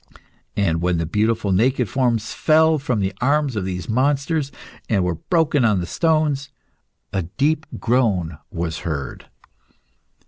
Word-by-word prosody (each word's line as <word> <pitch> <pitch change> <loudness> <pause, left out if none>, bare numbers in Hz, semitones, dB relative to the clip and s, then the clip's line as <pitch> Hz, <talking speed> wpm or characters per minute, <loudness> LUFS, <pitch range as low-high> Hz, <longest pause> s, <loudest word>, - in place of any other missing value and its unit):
And 85 -5 +1
when 90 0 +1
the 80 - -1
beautiful 105 +3 0
naked 125 +5 +2
forms 120 -4 0
fell 160 0 +4
from 125 -6 -1
the 95 0 -1
arms 140 0 +2
of 100 -3 -2
these 90 -2 -4
monsters, 140 +4 0 0.4
and 100 -4 +2
were 90 -1 0
broken 155 - +1
on 105 -4 +3
the 85 - -2
stones, 150 - +1 0.6
a 95 - +1
deep 145 - -1
groan 100 -10 +1
was 85 0 -3
heard. 75 -6 -5
115 Hz, 140 wpm, -21 LUFS, 90-145 Hz, 0.6 s, fell